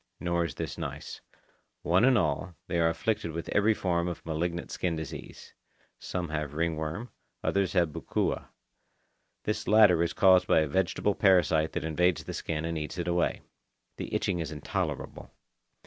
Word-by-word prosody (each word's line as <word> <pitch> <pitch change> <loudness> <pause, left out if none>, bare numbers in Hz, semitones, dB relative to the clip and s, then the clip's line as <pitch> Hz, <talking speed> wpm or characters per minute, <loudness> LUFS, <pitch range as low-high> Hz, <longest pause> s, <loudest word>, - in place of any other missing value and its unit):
Nor 85 -1 0
is 80 - -5
this - - -5
nice. - - -6 0.6
One 90 +5 +3
and 130 -2 +5
all, 95 -4 -1
they 85 -1 -1
are 80 0 +4
afflicted 85 -1 -1
with 85 +1 -5
every 105 +1 +3
form 85 -3 0
of 85 - -5
malignant 85 +2 -2
skin 85 -2 -1
disease. 80 -2 -8 0.5
Some 90 -3 -4
have 75 -2 -3
ringworm, 80 +6 -2 0.3
others 100 -2 +1
have 85 -4 +3
bukua. - - -2 1.0
This 110 +1 -2
latter 105 -6 +6
is 85 0 0
caused 95 -1 +5
by - - +5
a 80 - 0
vegetable 95 +5 +1
parasite 90 -6 +3
that - - -2
invades 85 +2 +1
the - - -6
skin 80 0 -3
and 85 -1 -2
eats 75 +4 -5
it 85 0 -3
away. 85 0 +1 0.6
The - - -5
itching 90 -3 0
is 80 - -3
intolerable. 75 -2 -4
85 Hz, 165 wpm, -29 LUFS, 80-95 Hz, 1.0 s, latter